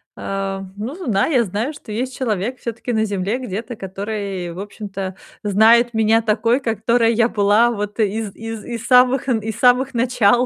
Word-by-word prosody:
э, 195 0 -3 0.2
ну 240 +9 -5
зна 225 - 0
я 255 -7 +3
знаю, 215 - -3
что 235 -6 -11
есть 255 +4 -3
человек 230 0 -2
всё-таки 235 +1 -4
на 220 0 +2
Земле 200 +3 -1
где-то, 225 0 -5
который, 195 -2 -5
в 180 - -9
общем-то, 195 -2 -6 0.3
знает 225 +4 +4
меня 225 +1 +3
такой, 230 +4 +1
которой 230 +1 +2
я 230 +1 +3
была 210 +2 +3
вот 210 0 -5
из 215 -1 -1
из 225 -1 -7
из 230 -1 -6
самых 255 +1 +4
э, 240 -3 +2
из 220 0 -5
самых 255 +1 +4
начал, 245 0 +3
225 Hz, 170 wpm, -20 LUFS, 205-245 Hz, 0.3 s, знает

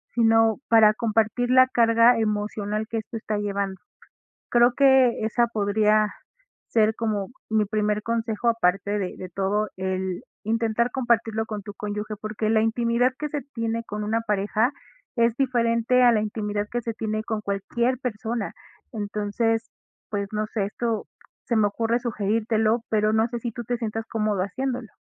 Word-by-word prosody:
sino 225 -1 +4
para 220 -2 +6
compartir 225 +2 0
la 255 0 +7
carga 230 -1 +4
emocional 210 0 -2
que 230 - -2
esto 220 +1 -7
está 215 -1 -3
llevando, 200 -2 -3 0.7
creo 240 +1 +5
que 265 -3 +4
esa 235 +2 +2
podría 215 -1 +2 0.6
ser 220 -1 +3
como 210 -4 -1 0.2
mi 220 -1 +3
primer 210 0 0
consejo 230 0 -1
aparte 200 -3 +1
de 185 -3 -4
de 185 - -6
todo, 195 +4 -1
el 185 -1 -3 0.2
intentar 230 +2 0
compartirlo 230 -4 0
con 215 -2 -5
tu 205 0 -9
cónyuge, 210 +1 -4
porque 215 0 -3
la 220 -1 +3
intimidad 235 +2 +1
que 300 - -3
se 290 -1 -4
tiene 230 0 -2
con 210 -1 -5
una 225 +2 0
pareja 210 +3 +1 0.4
es 230 -1 +2
diferente 240 -1 +2
a 245 -1 +7
la 220 - +2
intimidad 210 -1 -2
que 240 - 0
se 230 0 -4
tiene 215 0 -2
con 220 -2 -3
cualquier 235 +5 -1
persona. 230 -3 -3 0.4
Entonces, 220 +1 -1 0.4
pues 200 -2 -2
no 215 0 -1
sé, 215 -3 -1
esto 225 +1 -2 0.4
se 235 - -1
me 210 -1 +4
ocurre 230 +3 0
sugerírtelo, 220 0 0
pero 215 0 +2
no 220 +1 +2
sé 240 0 -4
si 235 0 -4
tú 240 - -6
te 245 +2 -1
sientas 225 -1 -4
cómodo 215 -4 0
haciéndolo. 250 +4 -3
220 Hz, 160 wpm, -24 LUFS, 210-235 Hz, 0.7 s, la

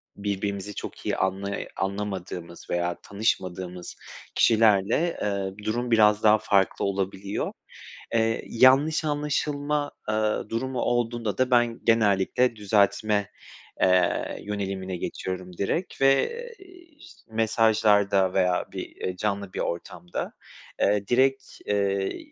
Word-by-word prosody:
birbirimizi 100 0 -3
çok - - -7
iyi - - 0
anlay 95 +1 -2
anlamadığımız 95 -3 -5
veya 85 0 0
tanışmadığımız 90 -4 -3 0.4
kişilerle, 110 - +3
eee, 100 0 -3
durum 120 +2 -1
biraz 105 -1 +5
daha 110 0 +6
farklı 100 -2 +1
olabiliyor. 100 0 -2 0.6
Eee, 115 0 +1
yanlış 135 +7 +4
anlaşılma, 145 0 -1 0.2
eee, 110 0 0
durumu 130 +2 -2
olduğunda 120 -4 -1
da 130 0 +1
ben 120 -1 +3
genellikle 115 +2 +2
düzeltme, 105 0 +1 0.5
eee, 90 -1 +2
yönelimine 95 -3 -4
geçiyorum 90 0 -5
direkt 165 - -2
ve, 135 0 +4 0.3
eee, 380 - -15 0.3
iş - - -15 0.2
mesajlarda 105 -4 +3
veya 90 -2 +2
bir, - - -7
eee, 90 - -4
canlı 100 -2 -2
bir - - -4
ortamda, 85 +1 -4 0.5
eee, 100 0 +2
direkt, 135 +2 +3 0.2
eee, 100 -1 0
105 Hz, 110 wpm, -26 LUFS, 95-115 Hz, 0.6 s, daha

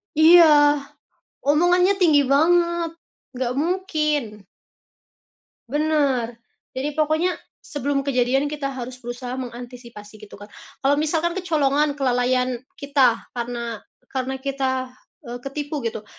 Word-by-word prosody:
Iya, 310 -3 +7 0.7
omongannya 350 +6 +4
tinggi 310 -5 +5
banget, 340 +4 +2 0.5
nggak 250 -1 -1
mungkin. 305 - -1 1.3
Bener, 280 -5 0 0.4
jadi 290 +3 -2
pokoknya 315 +4 +1 0.2
sebelum 280 -1 -3
kejadian 265 +1 +1
kita 290 -1 -3
harus 255 -1 -7
berusaha 245 +1 -6
mengantisipasi 240 -4 -9
gitu 210 - -12
Kak. 205 +1 -13 0.3
Kalau 280 - +5
misalkan 315 +3 0
kecolongan 300 -5 +1
kelalaian 250 -1 0 0.2
kita, 270 -5 +2
karena 235 -2 -4 0.3
karena 265 0 -2
kita, 260 -1 -2 0.3
eee, 245 +1 -7
ketipu 290 +1 -5
gitu, 220 -2 -4
275 Hz, 105 wpm, -22 LUFS, 245-305 Hz, 1.3 s, Iya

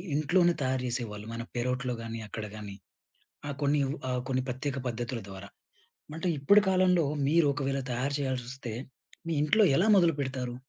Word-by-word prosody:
ఇంట్లోనే 175 +4 +3
తయారు 130 -1 0
చేసేవాళ్ళు 110 -4 -3
మన 115 - -4
పేరోట్లో 125 +1 -1
గానీ 115 0 -5
అక్కడ 105 0 -5
గాని. 105 -2 -7 0.7
ఆ - - -2
కొన్నివ్ 140 -1 +2 0.2
ఆ - - 0 0.2
కొన్ని 130 -1 0
ప్రత్యేక 130 +2 -3
పద్ధతుల 120 +1 -3
ద్వారా. 95 +1 -9 0.7
అంటే 170 +3 -2
ఇప్పటి 200 +10 +6
కాలంలో 185 -3 +4 0.2
మీరు 165 +1 +4
ఒకవేళ 135 -1 -1
తయారు 130 +4 -1
చేయాల్సొస్తే, 130 -3 -3 0.5
మీ 165 - -1
ఇంట్లో 215 +9 +4
ఎలా 195 - +3
మొదలు 170 -4 +4
పెడతారు? 130 -2 -3
130 Hz, 150 wpm, -29 LUFS, 120-150 Hz, 0.7 s, ఇప్పటి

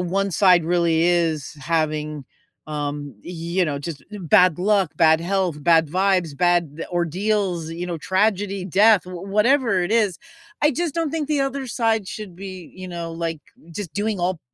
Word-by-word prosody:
1 190 +2 -1
side 180 -3 +5
really 170 -1 +2
is 165 -5 +1
having, 155 -1 -1 0.4
um, 145 -2 -4
y - - -7 0.3
you 185 - +5
know, 145 -3 -2
just 145 0 -7
e 210 - -7
bad 180 -1 +4
luck, 195 -2 +1
bad 160 -1 +5
health, 180 -4 -1
bad 165 0 +4
vibes, 180 -3 +1
bad 170 -2 +1
ordeals, 175 0 -1
you 170 +2 -5
know, 175 -2 -4
tragedy, 195 +1 0
death, 200 +2 +4
w 180 0 -8
whatever 220 0 +3
it 185 - -2
is. 210 -6 +2 0.4
I 300 +1 +3
just 330 +2 -2
don't 330 -3 -1
think 310 -3 -2
the 295 -2 +1
other 275 0 -2
side 225 -5 0
should 205 -1 -7
be, 185 -1 -9
you 185 0 -8
know, 170 -1 -5
like, 165 -1 -3 0.3
just 175 0 -6
doing 210 0 -1
all 175 -1 -1
180 Hz, 175 wpm, -22 LUFS, 165-205 Hz, 0.4 s, side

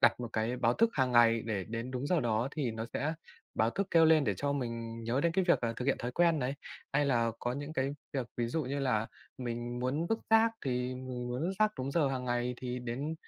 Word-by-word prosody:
đặt - - +4
một 120 - -3
cái 115 +3 0
báo 120 -1 +2
thức 230 0 +3
hàng 130 -3 +1
ngày, 115 -1 +5
để 100 -5 -1
đến 115 +3 -4
đúng 130 +2 -3
giờ 175 -2 +2
đó 115 +2 +1
thì 140 -5 -1
nó 110 0 -4
sẽ 155 +3 0 0.4
báo 110 +1 +2
thức 195 +7 -1
kêu 165 -1 +6
lên, 160 -2 +5
để 105 - +1
cho 140 0 0
mình 115 -4 -4
nhớ 120 +4 +1
đến 170 +1 +2
cái 185 +1 +2
việc 170 - +4
là 115 - 0
thực 125 - -3
hiện 140 - +1
thói 125 0 -4
quen 170 0 +3
này. 135 +1 -1 0.4
Hay 145 +1 +3
là 115 -4 +2
có 120 - -1
những 145 +4 -5
cái 135 -2 0 0.2
việc, 130 -4 -2
ví 120 -1 0
dụ 160 +6 -1
như 140 +2 -2
là 120 -5 +1 0.3
mình 120 -1 -4
muốn 140 +7 0
vứt 225 +5 0
rác, 225 0 +6
thì 125 -1 -1
mình 125 -1 -5
muốn 125 +3 -2
vứt 180 +3 0
rác 215 0 +4
đúng 130 +2 -2
giờ 145 -2 +2
hàng 130 -1 -2
ngày, 120 0 0
thì 125 0 -4
đến 130 +6 -3
125 Hz, 260 wpm, -32 LUFS, 120-145 Hz, 0.4 s, kêu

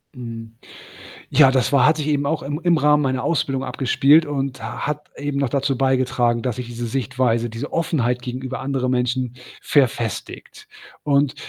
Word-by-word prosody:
Mhm, 115 -2 -8 0.8
ja, 140 -3 +6
das 130 +1 +1
war 140 -3 +5
hat 155 +1 +4
sich 150 - -2
eben 145 -1 +1
auch 160 0 -1
im 145 +4 -4
im 175 -2 +3
Rahmen 150 -1 +3
meiner 130 -1 -1
Ausbildung 135 -5 0
abgespielt 145 +5 +3
und 135 -4 -3
ha 110 +1 -5
hat 150 0 -4
eben 145 -1 -3
noch 140 -3 +1
dazu 140 +1 0
beigetragen, 130 -3 +1
dass 125 -2 -2
sich 125 -1 -5
diese 120 0 -5
Sichtweise, 120 -1 0
diese 115 +6 -6
Offenheit 125 -7 0
gegenüber 130 +1 -5
anderen 135 -2 -1
Menschen 125 0 -1 0.3
verfestigt 120 -6 -1 0.4
und 140 -1 +2
130 Hz, 165 wpm, -21 LUFS, 125-145 Hz, 0.8 s, ja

